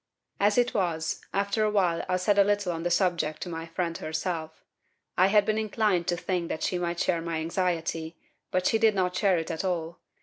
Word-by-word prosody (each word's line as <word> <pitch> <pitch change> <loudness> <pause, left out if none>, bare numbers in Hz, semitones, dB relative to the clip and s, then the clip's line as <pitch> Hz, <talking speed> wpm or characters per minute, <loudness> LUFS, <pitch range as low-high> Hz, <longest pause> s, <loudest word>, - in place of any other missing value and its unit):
"As 205 +2 +3
it 245 0 +3
was, 165 -5 -1
after 200 +2 0
a 215 - +3
while 180 -5 +1
I 185 - +2
said 200 +2 +2
a - - +8
little 205 -2 +1
on 165 -1 -4
the 175 - -1
subject 175 -4 +1
to 180 - -6
my 165 0 -5
friend 165 0 -2
herself. 160 0 -4 0.5
I 185 - +5
had 205 +1 +4
been 215 0 +1
inclined 210 -5 +1
to 175 - +1
think 180 -1 -2
that - - -3
she 180 - 0
might 170 -1 -2
share 170 -2 +1
my 165 -1 -3
anxiety, 165 -1 -2 0.3
but 185 0 0
she 225 - +3
did 220 -2 +4
not 180 -1 0
share 195 -3 +3
it 165 +1 -3
at 160 - -3
all. 170 -2 -2
180 Hz, 215 wpm, -27 LUFS, 165-200 Hz, 0.5 s, a